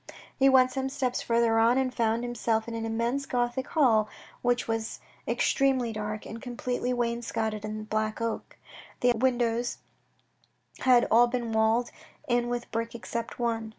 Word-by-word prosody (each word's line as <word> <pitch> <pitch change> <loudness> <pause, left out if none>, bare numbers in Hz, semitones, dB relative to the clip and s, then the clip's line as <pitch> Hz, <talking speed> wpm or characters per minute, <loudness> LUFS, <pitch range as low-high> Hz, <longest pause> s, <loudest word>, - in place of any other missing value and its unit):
He 270 0 +6
went 255 -1 +5
some 265 0 -2
steps 265 -2 -1
further 230 -1 +2
on, 230 +3 +4
and 260 -1 0
found 230 -1 0
himself 230 -2 -1
in 230 - -5
an 225 0 -3
immense 235 +5 -1
Gothic 245 +2 -1
hall, 225 -9 +3 0.3
which 245 -1 +1
was 225 -1 -3 0.3
extremely 260 -4 +1
dark, 215 0 -4
and 230 - -8
completely 245 -1 -3
wainscotted 230 -3 -2
in 215 0 -5
black 215 0 -2
oak. 230 -1 -4 0.4
The 245 - +5
ogive 230 -1 -2
windows 240 -2 +1 1.0
had 250 -2 +5
all 240 +2 +6
been 240 -1 -3
walled 220 +2 +2 0.4
in 240 -1 +1
with 240 0 -4
brick 230 +1 -3
except 235 0 -5
one. 230 -2 -1
235 Hz, 155 wpm, -28 LUFS, 225-245 Hz, 1.0 s, He